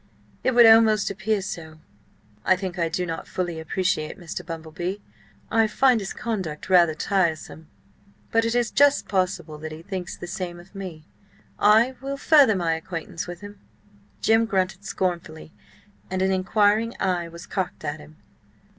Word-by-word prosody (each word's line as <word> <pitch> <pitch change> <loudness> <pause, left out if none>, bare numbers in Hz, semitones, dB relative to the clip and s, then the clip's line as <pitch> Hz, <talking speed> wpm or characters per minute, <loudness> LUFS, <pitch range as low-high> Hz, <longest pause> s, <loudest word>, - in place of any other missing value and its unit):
It 260 - +1
would 240 -1 +8
almost 225 -3 +6
appear 210 0 -1
so. 160 -4 -7 0.7
I 185 - +4
think 185 -1 -5
I 165 -1 +1
do 180 +2 -2
not 165 -1 -5
fully 175 -3 -3
appreciate 160 -1 -1
Mr. 175 -1 -6
Bumble 165 -2 -7
Bee. 180 +5 -4 0.5
I 225 0 +4
find 250 +2 +3
his 195 -2 -5
conduct 190 -8 -4
rather 170 -4 +5
tiresome. 160 -3 -1 0.6
But 225 0 +3
it 230 +1 0
is 240 -1 +1
just 285 0 +4
possible 180 -5 -1
that 155 +1 -6
he 155 +1 -9
thinks 185 -1 -5
the - - -7
same 175 -1 -5
of 175 +3 -16
me. 180 -6 -8 0.5
I 225 +5 +4
will 275 +1 -4
further 280 -7 +5
my 170 -3 +1
acquaintance 165 +1 -5
with 175 +1 -8
him." 205 0 -11 0.6
Jim 225 +1 +3
grunted 190 -1 -1
scornfully, 170 -4 -3 0.6
and 185 0 -1
an 190 - +2
inquiring 205 +4 +2
eye 180 -3 0
was 170 +1 -11
cocked 185 -4 -4
at 145 +1 -3
him. 150 +1 -14
185 Hz, 165 wpm, -24 LUFS, 165-215 Hz, 0.7 s, would